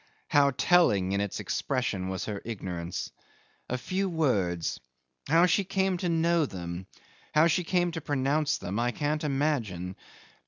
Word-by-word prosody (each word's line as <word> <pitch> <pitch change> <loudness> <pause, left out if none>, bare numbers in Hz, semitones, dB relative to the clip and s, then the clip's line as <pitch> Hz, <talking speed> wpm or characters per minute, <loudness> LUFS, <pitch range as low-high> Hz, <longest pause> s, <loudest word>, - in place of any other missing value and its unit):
How 145 -1 +5
telling 125 - +3
in 100 0 +1
its 100 -2 -3
expression 105 -8 -1
was 95 -1 -3
her 105 -2 -4
ignorance. 90 -6 -5 0.6
A 125 - -1
few 190 +9 -1
words! 100 - 0 0.5
How 165 +3 +5
she 180 +3 +3
came 190 -1 0
to 175 0 -1
know 165 -1 +2
them, 90 -1 -6 0.5
how 155 +2 +6
she 170 +2 +2
came 175 0 +1
to 165 -1 -5
pronounce 145 +1 +1
them, 95 +5 -4
I 120 +1 +2
can't 150 +1 -1
imagine. 125 - -1
140 Hz, 150 wpm, -28 LUFS, -, 0.6 s, how